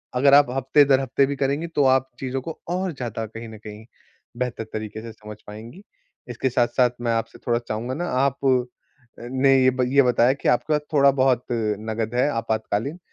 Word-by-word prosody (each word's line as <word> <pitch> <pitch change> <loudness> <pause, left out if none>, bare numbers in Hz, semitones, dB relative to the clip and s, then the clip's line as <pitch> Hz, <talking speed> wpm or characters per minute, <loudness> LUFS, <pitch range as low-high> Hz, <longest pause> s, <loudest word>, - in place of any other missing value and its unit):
अगर 140 +2 +4
आप 145 -3 +6
हफ्ते-दर-हफ्ते 135 0 +3
भी 140 +1 -3
करेंगी, 140 +5 -1
तो 150 -4 0
आप 130 0 +3
चीज़ों 130 0 -3
को 165 +4 -8
और 180 -1 -2
ज़्यादा 115 -4 -5
कहीं 115 +1 -9
न 110 - -10
कहीं 105 +1 -9 0.5
बेहतर 125 -2 -3
तरीके 110 0 -5
से 115 0 -8
समझ 105 -1 -11
पाएँगी। 115 - -10 0.5
इसके 130 - -1
साथ-साथ 125 +1 +2
मैं 120 -1 0
आपसे 115 0 -3
थोड़ा 120 0 +2
चाहूँगा 120 +2 -4
ना 175 +5 -3
आप 135 +1 +1
अ, 130 -1 +5 0.6
ने 130 +2 +2
ये 130 - +6
ब 130 0 -1
ये 140 - +7
बताया 125 +1 +3
कि 140 - -2
आपके 150 +5 +1
पास 150 - +1
थोड़ा-बहुत 135 -3 +3
नगद 110 0 -2
है 125 +3 +2
आपातकालीन, 115 - -2
125 Hz, 185 wpm, -23 LUFS, 115-135 Hz, 0.6 s, ये